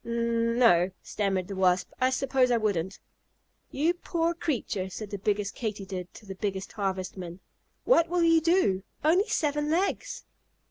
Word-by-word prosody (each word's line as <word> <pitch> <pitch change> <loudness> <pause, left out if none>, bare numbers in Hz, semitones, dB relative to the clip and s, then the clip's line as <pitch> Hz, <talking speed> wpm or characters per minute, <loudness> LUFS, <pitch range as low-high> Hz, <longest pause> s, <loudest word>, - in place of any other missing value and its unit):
"N 235 0 0
no," 185 -8 +5
stammered 195 -3 -1
the 200 - -6
Wasp, 185 -1 +2
"I 255 - +4
suppose 265 -1 +1
I 240 - +3
wouldn't." 195 -4 -1 0.7
"You 315 +6 +1
poor 340 -1 -1
creature!" 240 - -2
said 205 +2 -7
the 200 - -4
biggest 205 0 -1
Katydid 195 -5 -5
to 215 - -13
the 195 - -6
biggest 195 -1 -4
Harvestman. 185 -3 -4 0.5
"What 335 -10 +4
will 350 0 +1
you 330 -1 +5
do? 330 - +2 0.2
Only 355 +8 +3
seven 295 0 0
legs!" 360 +5 -1
225 Hz, 150 wpm, -28 LUFS, 190-300 Hz, 0.7 s, no